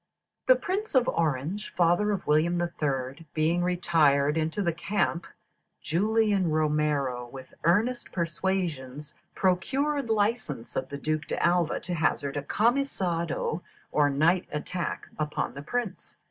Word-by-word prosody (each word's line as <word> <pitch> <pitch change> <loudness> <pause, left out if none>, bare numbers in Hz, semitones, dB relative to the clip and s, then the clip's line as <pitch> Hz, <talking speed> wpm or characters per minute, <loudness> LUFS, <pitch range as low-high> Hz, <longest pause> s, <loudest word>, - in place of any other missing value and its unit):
"The 255 - +8
Prince 375 +9 -3
of 255 -1 +4
Orange 165 +6 -1
(father 175 +4 +3
of 195 -3 -2
William 160 +4 +2
III.) 145 -3 -2
being 165 +3 +2
retired 155 -5 +3
into 160 +5 -1
the 170 -3 +1
camp, 170 0 -1 0.5
Julian 205 +1 +2
Romero, 150 -5 0
with 130 +1 -11
earnest 220 +9 +2
persuasions, 160 -5 -2 0.2
procured 270 +9 +1
license 210 - -1
of 130 - -2
the 140 - -5
Duke 155 +1 -2
D'Alva 175 -1 +1
to 180 - -4
hazard 150 -4 0
a 145 - -1
camisado, 180 - 0 0.3
or 145 -1 +3
night 165 +6 +2
attack, 170 +3 -3
upon 150 -1 -2
the 140 - -7
prince. 210 +5 -4
170 Hz, 125 wpm, -27 LUFS, 150-200 Hz, 0.5 s, The